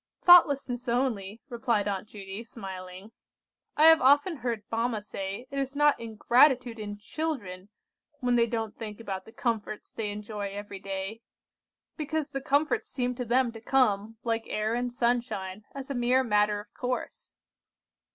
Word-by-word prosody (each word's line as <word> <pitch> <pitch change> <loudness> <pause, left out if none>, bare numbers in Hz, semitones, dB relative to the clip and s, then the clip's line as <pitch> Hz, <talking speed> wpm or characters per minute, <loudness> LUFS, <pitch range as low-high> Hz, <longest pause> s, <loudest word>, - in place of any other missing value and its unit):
"Thoughtlessness 280 -8 +6
only," 230 -4 -1
replied 235 -5 0
Aunt 200 0 -2
Judy, 200 +1 -8
smiling. 190 -3 -9 0.7
"I 300 - +4
have 320 0 +8
often 290 +6 +4
heard 235 -4 -3
mamma 230 0 0
say 200 +2 -6
it 275 - -2
is 275 0 -3
not 295 0 +4
ingratitude 240 +2 +3
in 205 -1 -5
children 210 -7 -4 0.5
when 250 -2 +1
they 235 -1 +4
don't 225 -2 -3
think 215 -2 -7
about 195 -4 -5
the - - -13
comforts 225 -3 -3
they 215 -2 -3
enjoy 205 0 -5
every 205 -1 -7
day; 195 +3 -5 0.8
because 310 -1 -2
the 275 - -3
comforts 290 +2 +1
seem 250 -1 -1
to 250 0 -4
them 245 +1 +2
to 225 -1 -11
come, 225 -4 +1
like 230 -1 -1
air 215 +1 -1
and 245 +1 -1
sunshine, 235 -5 -1
as 275 0 -6
a - - 0
mere 250 +1 +3
matter 210 -2 +2
of 205 0 -12
course." 250 0 -4
230 Hz, 155 wpm, -28 LUFS, 205-255 Hz, 0.8 s, have